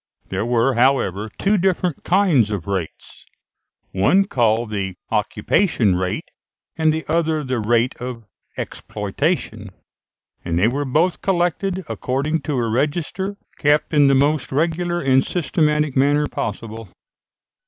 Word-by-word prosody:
There 115 - -2
were, 120 +2 +2
however, 115 -5 +1
two 200 0 +2
different 180 -3 0
kinds 175 - +3
of 100 -6 -3
rates, 95 -5 -5 0.7
one 180 - +3
called 115 - +1
the 95 -3 -3 0.2
occupation 120 - +1
rate, 90 0 -3 0.4
and 160 -1 +2
the 160 +1 -3
other 160 -1 0
the 130 -3 -2
rate 115 +3 +1
of 125 -2 -6 0.3
exploitation; 110 - -3 0.7
and 85 -1 -2
they 95 +5 +4
were 140 +4 -1
both 160 +7 +1
collected 185 +1 0
according 145 +5 -2
to - - +1
a 120 -2 0
register, 165 - -1 0.2
kept 150 +2 +2
in 145 -2 +5
the 135 - +4
most 145 +1 +1
regular 170 +4 0
and 130 -3 +3
systematic 150 -3 0
manner 145 +2 +3
possible. 110 -2 -5
140 Hz, 130 wpm, -21 LUFS, 115-165 Hz, 0.7 s, in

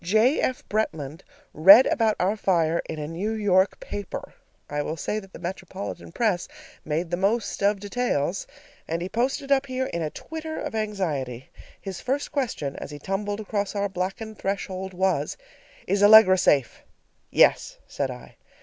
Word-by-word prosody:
J. 220 - +3
F. 255 - -2
Bretland 160 -7 -2 0.3
read 195 - +9
about 225 -9 +2
our 190 +4 +1
fire 170 -5 +1
in 160 - -4
a 150 -1 -4
New 185 +7 -3
York 200 -3 +2
paper 205 -2 -6 0.3
(I 145 0 -2
will 155 +2 -4
say 210 +7 -2
that 195 -2 -14
the - - -10
metropolitan 185 +1 -6
press 200 -4 0 0.4
made 165 +3 -2
the 175 - 0
most 205 +4 0
of 200 0 +2
details), 200 - -1 0.4
and 165 +1 -2
he 185 - -4
posted 270 +5 -1
up 275 0 +3
here 260 0 -2
in 170 -8 -3
a 155 - -1
twitter 320 - -6
of - - -5
anxiety. 160 - -3 0.3
His 195 -3 -7
first 275 +3 -2
question 225 - -2
as - - -7
he 145 - -8
tumbled 205 +6 -3
across 205 -1 -3
our 200 0 0
blackened 195 +4 -4
threshold 190 -1 -3
was, 190 +1 0 0.5
"Is 200 0 0
Allegra 205 -2 +9
safe?" 135 -9 +2 0.5
"Yes," - - +3
said - - -3
I. - - -10
195 Hz, 165 wpm, -25 LUFS, 170-220 Hz, 0.5 s, read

